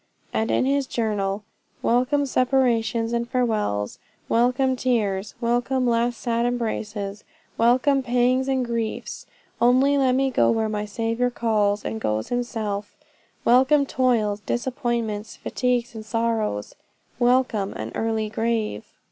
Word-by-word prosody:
And 220 Hz, -, 0 dB
in -, -, +2 dB
his 275 Hz, 0 st, +1 dB
journal 210 Hz, -4 st, -1 dB, 0.4 s
"Welcome 255 Hz, +4 st, +2 dB
separations 240 Hz, -4 st, +1 dB
and 235 Hz, 0 st, -1 dB
farewells; 215 Hz, -, -1 dB, 0.3 s
welcome 250 Hz, +3 st, +2 dB
tears; 210 Hz, -6 st, -1 dB
welcome 245 Hz, +2 st, 0 dB
last 240 Hz, 0 st, +1 dB
sad 235 Hz, -1 st, 0 dB
embraces; 215 Hz, -4 st, -3 dB, 0.3 s
welcome 255 Hz, +4 st, +3 dB
pangs 250 Hz, +1 st, +2 dB
and 260 Hz, -2 st, +1 dB
griefs; 230 Hz, -2 st, -4 dB, 0.3 s
only 260 Hz, +4 st, +4 dB
let 260 Hz, -2 st, +3 dB
me 270 Hz, 0 st, +1 dB
go -, -, +3 dB
where 225 Hz, -1 st, +1 dB
my 210 Hz, -1 st, -2 dB
Saviour 230 Hz, +3 st, -1 dB
calls 210 Hz, -4 st, 0 dB
and 220 Hz, -, -3 dB
goes 110 Hz, 0 st, -1 dB
himself; 220 Hz, -4 st, -3 dB, 0.5 s
welcome 265 Hz, +4 st, +5 dB
toils, 235 Hz, -6 st, +1 dB
disappointments, 235 Hz, -3 st, -2 dB
fatigues 245 Hz, -1 st, -1 dB
and 220 Hz, -1 st, -7 dB
sorrows; 225 Hz, -, -1 dB, 0.5 s
WELCOME 240 Hz, -5 st, +2 dB
AN -, -, -6 dB
EARLY 220 Hz, -1 st, -1 dB
GRAVE!" 220 Hz, -, -1 dB
235 Hz, 120 wpm, -24 LUFS, 215-250 Hz, 0.5 s, welcome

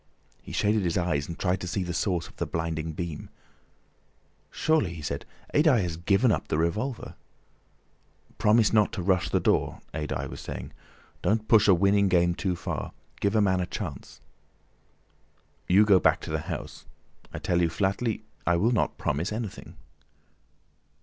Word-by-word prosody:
He -, -, -11 dB
shaded 105 Hz, +1 st, +1 dB
his 85 Hz, -3 st, 0 dB
eyes 85 Hz, -6 st, 0 dB
and 85 Hz, -, -6 dB
tried 90 Hz, -1 st, 0 dB
to 90 Hz, -, -4 dB
see 95 Hz, +2 st, -1 dB
the 90 Hz, -1 st, -4 dB
source 90 Hz, -2 st, -1 dB
of -, -, -19 dB
the -, -, -2 dB
blinding 80 Hz, -1 st, -3 dB
beam. 85 Hz, -2 st, -5 dB, 1.2 s
"Surely!" 150 Hz, -, +1 dB
he 80 Hz, -, -8 dB
said, 70 Hz, -1 st, -4 dB, 0.3 s
"Adye 145 Hz, -, +4 dB
has 85 Hz, -2 st, -3 dB
given 100 Hz, +8 st, +2 dB
up -, -, -1 dB
the -, -, 0 dB
revolver." 105 Hz, -, -2 dB, 1.3 s
"Promise 110 Hz, +1 st, +4 dB
not 105 Hz, -2 st, +4 dB
to 90 Hz, -, -3 dB
rush 95 Hz, -1 st, +2 dB
the -, -, +2 dB
door," -, -, +1 dB
Adye 75 Hz, -1 st, -3 dB
was -, -, -8 dB
saying. -, -, -7 dB, 0.5 s
"Don't 110 Hz, +1 st, 0 dB
push 110 Hz, -2 st, +5 dB
a 95 Hz, -, +7 dB
winning 100 Hz, +2 st, +3 dB
game 85 Hz, -1 st, +3 dB
too 90 Hz, 0 st, -2 dB
far. 85 Hz, -, -5 dB, 0.3 s
Give 100 Hz, +1 st, 0 dB
a 110 Hz, -, +4 dB
man 95 Hz, -2 st, +2 dB
a 90 Hz, -, -2 dB
chance." 85 Hz, -10 st, -7 dB, 1.5 s
"You 100 Hz, +4 st, +6 dB
go 100 Hz, -3 st, +6 dB
back -, -, +3 dB
to -, -, -6 dB
the -, -, 0 dB
house. -, -, -6 dB, 0.4 s
I -, -, -6 dB
tell 90 Hz, 0 st, 0 dB
you 85 Hz, -, +2 dB
flatly 100 Hz, +6 st, -1 dB, 0.2 s
I 85 Hz, -, +4 dB
will 105 Hz, +8 st, +2 dB
not 115 Hz, -, 0 dB
promise 75 Hz, +7 st, -1 dB
anything." 110 Hz, -2 st, -6 dB
95 Hz, 170 wpm, -27 LUFS, 85-105 Hz, 1.5 s, a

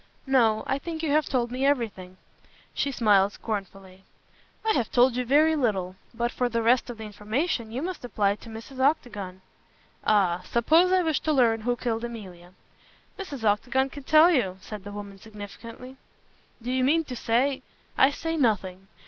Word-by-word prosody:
"No. 235 Hz, -5 st, +3 dB
I 270 Hz, -, -1 dB
think 325 Hz, +1 st, -6 dB
you 305 Hz, -, 0 dB
have 305 Hz, 0 st, +2 dB
told 240 Hz, -3 st, -1 dB
me 255 Hz, +2 st, -3 dB
everything." 220 Hz, -10 st, -1 dB, 0.6 s
She 280 Hz, -, -1 dB
smiled 205 Hz, -5 st, +3 dB
scornfully. 195 Hz, -3 st, -6 dB, 0.6 s
"I 440 Hz, -, +3 dB
have 240 Hz, -5 st, -1 dB
told 245 Hz, 0 st, +4 dB
you 250 Hz, -, 0 dB
very 300 Hz, +5 st, +4 dB
little. 195 Hz, -10 st, -1 dB, 0.2 s
But 235 Hz, 0 st, -2 dB
for 250 Hz, -1 st, -1 dB
the 230 Hz, -1 st, -1 dB
rest 245 Hz, +2 st, +3 dB
of 240 Hz, -, -6 dB
the 220 Hz, -, -8 dB
information 220 Hz, -, -2 dB
you 255 Hz, +5 st, -4 dB
must 365 Hz, -4 st, -5 dB
apply 205 Hz, -4 st, 0 dB
to 230 Hz, -, -13 dB
Mrs. 225 Hz, +4 st, -10 dB
Octagon." 210 Hz, -10 st, -1 dB, 0.6 s
"Ah! 185 Hz, -4 st, +2 dB
Supposing 330 Hz, +10 st, +3 dB
I 365 Hz, -, +2 dB
wish 320 Hz, -4 st, +1 dB
to 310 Hz, -, -1 dB
learn 235 Hz, -6 st, +3 dB
who 245 Hz, +2 st, 0 dB
killed 230 Hz, -1 st, -3 dB
Emilia?" 185 Hz, -7 st, -9 dB, 0.7 s
"Mrs. 290 Hz, -, -6 dB
Octagon 250 Hz, +6 st, +1 dB
can 285 Hz, -, -8 dB
tell 310 Hz, +5 st, +6 dB
you!" 195 Hz, -, +1 dB
said 205 Hz, 0 st, -9 dB
the 205 Hz, -, -7 dB
woman 200 Hz, -1 st, -8 dB
significantly. 225 Hz, +5 st, -10 dB, 0.7 s
"Do 245 Hz, -, -3 dB
you 255 Hz, 0 st, +1 dB
mean 320 Hz, +5 st, +3 dB
to 255 Hz, -5 st, -7 dB
say 260 Hz, +4 st, +1 dB, 0.2 s
" -, -, -35 dB
"I -, -, +3 dB
say 325 Hz, +3 st, -3 dB
nothing. 195 Hz, -7 st, 0 dB
235 Hz, 180 wpm, -26 LUFS, 205-275 Hz, 0.7 s, tell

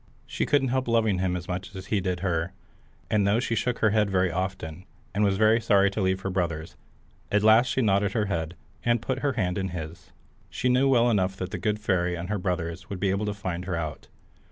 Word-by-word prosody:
She -, -, -2 dB
couldn't 140 Hz, -3 st, +2 dB
help 130 Hz, 0 st, 0 dB
loving 110 Hz, -5 st, +2 dB
him 90 Hz, -1 st, 0 dB
as 90 Hz, -1 st, -5 dB
much 90 Hz, +2 st, -5 dB
as 95 Hz, 0 st, -7 dB
he 100 Hz, 0 st, 0 dB
did 90 Hz, -1 st, -2 dB
her, 85 Hz, -2 st, -1 dB, 0.6 s
and 105 Hz, -2 st, +3 dB
though 105 Hz, +3 st, +3 dB
she 125 Hz, -1 st, -1 dB
shook 120 Hz, +1 st, 0 dB
her 110 Hz, -, +4 dB
head 105 Hz, -1 st, +2 dB
very 95 Hz, -2 st, +2 dB
often, 95 Hz, -1 st, -4 dB, 0.3 s
and 105 Hz, +2 st, +1 dB
was 100 Hz, -1 st, +2 dB
very 110 Hz, +2 st, +4 dB
sorry 100 Hz, -2 st, +4 dB
to 105 Hz, -, -2 dB
leave 95 Hz, 0 st, +1 dB
her 95 Hz, -, -3 dB
brothers, 85 Hz, -4 st, -2 dB, 0.6 s
at 105 Hz, 0 st, +2 dB
last 110 Hz, +3 st, +6 dB
she 130 Hz, +1 st, 0 dB
nodded 100 Hz, -1 st, +2 dB
her 110 Hz, -2 st, +1 dB
head, 85 Hz, -3 st, -3 dB, 0.3 s
and 120 Hz, 0 st, +2 dB
put 130 Hz, +3 st, -2 dB
her 140 Hz, 0 st, 0 dB
hand 95 Hz, -5 st, -1 dB
in 95 Hz, -, -1 dB
his. 85 Hz, -1 st, -7 dB, 0.4 s
She 125 Hz, -, -1 dB
knew 130 Hz, +2 st, +4 dB
well 120 Hz, -2 st, +4 dB
enough 95 Hz, -3 st, +1 dB
that 90 Hz, 0 st, -5 dB
the -, -, -4 dB
good 105 Hz, -1 st, 0 dB
fairy 90 Hz, -4 st, 0 dB
and 85 Hz, +2 st, -6 dB
her 105 Hz, -1 st, -1 dB
brothers 90 Hz, 0 st, -3 dB
would 100 Hz, -3 st, -5 dB
be 100 Hz, -1 st, +1 dB
able 100 Hz, +2 st, -1 dB
to 105 Hz, -, -1 dB
find 90 Hz, -3 st, -4 dB
her 90 Hz, -1 st, -2 dB
out. 80 Hz, -2 st, -5 dB
95 Hz, 235 wpm, -26 LUFS, 90-110 Hz, 0.6 s, last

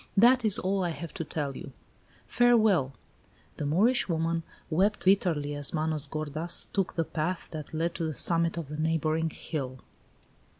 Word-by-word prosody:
That 245 Hz, +4 st, +6 dB
is 215 Hz, -3 st, +5 dB
all 190 Hz, +1 st, 0 dB
I 175 Hz, -, 0 dB
have 170 Hz, 0 st, -6 dB
to -, -, -4 dB
tell 145 Hz, -3 st, -3 dB
you. -, -, -9 dB, 0.5 s
Farewell!" 220 Hz, -, +3 dB, 0.6 s
The 145 Hz, -, -2 dB
Moorish 210 Hz, -, +3 dB
woman 165 Hz, 0 st, 0 dB, 0.3 s
wept 195 Hz, +6 st, +1 dB
bitterly 170 Hz, -7 st, +2 dB
as 145 Hz, +2 st, -1 dB
Manos 155 Hz, -1 st, -1 dB
gordas 155 Hz, +3 st, -2 dB
took 195 Hz, -2 st, 0 dB
the 165 Hz, -, 0 dB
path 170 Hz, +4 st, -3 dB
that 155 Hz, -3 st, -7 dB
led 165 Hz, +2 st, -1 dB
to 165 Hz, -, -3 dB
the 155 Hz, -2 st, -3 dB
summit 170 Hz, 0 st, +1 dB
of 165 Hz, -4 st, -4 dB
the 150 Hz, -, -5 dB
neighboring 160 Hz, 0 st, 0 dB
hill. 130 Hz, -5 st, -5 dB
165 Hz, 165 wpm, -28 LUFS, 155-185 Hz, 0.6 s, That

